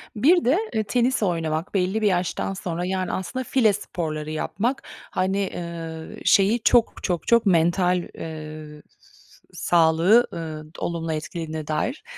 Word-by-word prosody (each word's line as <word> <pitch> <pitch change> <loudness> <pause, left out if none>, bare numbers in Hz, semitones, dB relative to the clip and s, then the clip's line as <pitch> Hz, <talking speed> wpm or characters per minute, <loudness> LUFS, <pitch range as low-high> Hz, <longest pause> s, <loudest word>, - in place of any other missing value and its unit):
Bir 325 - +4
de, 270 +7 +4 0.2
eee, 220 - +1
tenis 245 +2 +1
oynamak 165 -1 -1
belli 195 +3 0
bir 210 - +3
yaştan 185 0 0
sonra, 175 -2 -4
yani, 185 0 -2
aslında 255 +8 -3
file 235 -5 +3
sporları 155 -6 -4
yapmak. 225 - -2 0.3
Hani, 190 +1 0
eee, 170 -4 -5
şeyi 210 +4 +4
çok, 240 -2 +3
çok, 175 -3 -2
çok 235 -2 +4
mental, 180 0 +3 0.2
eee, 155 -1 -8 0.2
s - - -24
sağlığı, 170 +7 +4
eee, 155 -2 -6
olumlu 165 -1 -2
etkilediğine 155 0 -5
dair 155 - -2
175 Hz, 140 wpm, -24 LUFS, 160-210 Hz, 0.3 s, Bir